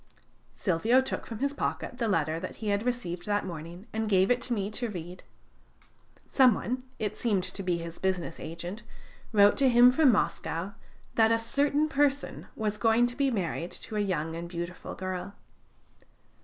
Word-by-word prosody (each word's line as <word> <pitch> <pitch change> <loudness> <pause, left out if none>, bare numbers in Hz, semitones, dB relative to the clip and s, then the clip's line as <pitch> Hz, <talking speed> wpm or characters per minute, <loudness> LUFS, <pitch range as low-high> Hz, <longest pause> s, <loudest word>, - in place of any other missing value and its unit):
Silvio 215 +7 +3
took 260 - -3
from 225 - -6
his 280 +4 -1
pocket 255 -2 -3
the 230 - +1
letter 160 -5 +1
that 185 - -6
he 215 - -4
had 200 0 +1
received 225 -7 -3
that 205 -1 +1
morning, 170 +2 -7
and 220 0 -1
gave 190 +1 +4
it 245 0 +2
to 250 - -4
me 205 -3 -1
to 240 +2 -2
read. 180 -2 -7 1.1
Some 255 -5 +6
one 255 +2 -3 0.2
(it 210 -2 -3
seemed 205 -6 +1
to 195 - -4
be 180 -2 0
his 170 0 -7
business 185 -3 -2
agent) 175 +6 -6 0.5
wrote 205 -2 +5
to 270 -1 +4
him 245 +1 +7
from 275 0 +5
Moscow, 190 -3 -1 0.4
that 225 0 +4
a 230 - +4
CERTAIN 280 +6 +1
PERSON 285 -1 0
was 210 -1 -2
going 225 +3 +4
to 245 0 -3
be 280 0 +2
married 180 -6 -2
to 220 - -8
a - - +1
young 165 -5 -1
and 170 +1 -6
beautiful 175 0 -6
girl. 185 +1 -5
210 Hz, 180 wpm, -29 LUFS, 180-245 Hz, 1.1 s, him